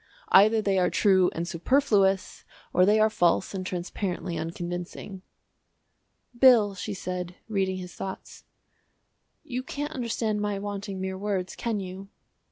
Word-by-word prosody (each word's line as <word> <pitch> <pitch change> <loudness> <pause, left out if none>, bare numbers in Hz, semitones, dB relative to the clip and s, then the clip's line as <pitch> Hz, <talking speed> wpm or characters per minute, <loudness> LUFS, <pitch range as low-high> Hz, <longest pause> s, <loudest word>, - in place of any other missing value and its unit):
Either 215 +3 +6
they 195 -2 +2
are 180 - +3
true 190 -3 +4
and 170 +1 -3
superfluous, 195 - +1 0.3
or 180 +1 +4
they 215 +1 +4
are 215 - +5
false 175 -3 +1
and 185 -1 -4
transparently 180 0 -3
unconvincing." 175 +3 -5 1.1
"Bill," 240 -5 +6
she 200 +2 -5
said, 180 -1 -5
reading 190 -3 -1
his 180 -1 -8
thoughts, 190 -1 -8 1.0
"you 250 -1 -4
can't 290 +3 -5
understand 225 -3 -1
my 205 -1 -1
wanting 200 -1 -5
mere 190 0 -4
words, 195 -3 -2
can 230 -3 -2
you?" 190 +1 -8
195 Hz, 135 wpm, -27 LUFS, 185-210 Hz, 1.1 s, Either